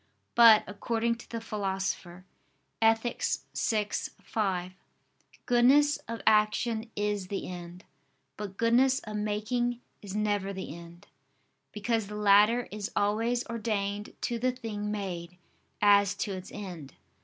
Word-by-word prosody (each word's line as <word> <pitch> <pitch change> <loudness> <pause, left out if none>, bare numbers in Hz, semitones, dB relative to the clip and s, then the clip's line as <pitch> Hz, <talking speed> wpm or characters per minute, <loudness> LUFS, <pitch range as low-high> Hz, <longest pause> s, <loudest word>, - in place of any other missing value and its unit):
But, 230 -2 +8
according 230 +3 -1
to 235 - -14
the 230 - -4
Philosopher 190 -4 -3 0.6
(Ethic. 225 +1 +2 0.3
vi, 215 -2 +1 0.4
5), 185 -4 -1 0.7
"goodness 275 +4 +5
of 230 0 -5
action 220 +1 +2
is 205 -2 -1
the 195 +1 -4
end, 180 0 -8 0.5
but 200 -2 -7
goodness 250 +3 +4
of 215 -1 -6
making 215 +4 -1 0.2
is 200 -1 -7
never 205 -2 0
the 190 -5 -6
end": 170 0 -13 0.7
because 220 0 -1
the 210 - -7
latter 210 +3 +4
is 210 +2 -5
always 225 +4 +1
ordained 210 -3 -3
to 235 -1 -2
the 255 +2 +2
thing 220 -4 -5
made, 180 -4 -5 0.5
as 200 -1 +5
to 205 - -3
its 185 -1 -7
end. 175 -9 -8
210 Hz, 125 wpm, -29 LUFS, 195-230 Hz, 0.7 s, But